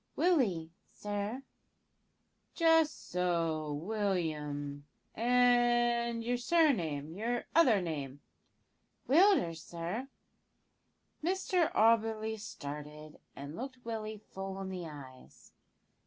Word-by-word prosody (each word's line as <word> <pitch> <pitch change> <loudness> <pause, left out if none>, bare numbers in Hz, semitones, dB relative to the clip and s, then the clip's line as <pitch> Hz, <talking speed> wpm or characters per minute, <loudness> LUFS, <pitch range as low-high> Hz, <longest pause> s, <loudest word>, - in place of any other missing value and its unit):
"Willie, 215 - +2 0.2
sir." 205 +5 -4 1.1
"Just 325 -2 +3
so, 165 -4 0
William; 150 -6 -2 0.3
and 240 -1 +3
your 245 +1 0
surname 190 - +1
your 235 +5 -2
other 240 - +5
name?" 145 -5 -4 0.9
"Willders, 280 - +4
sir." 175 - -5 1.2
Mr 365 -1 +1
Auberly 220 0 +2
started, 150 -4 -8 0.2
and 140 +3 -8
looked 255 +2 -7
Willie 220 -2 -4
full 195 0 -5
in 190 -1 -5
the 180 -3 -5
eyes. 135 -4 -13
205 Hz, 85 wpm, -32 LUFS, 160-245 Hz, 1.2 s, other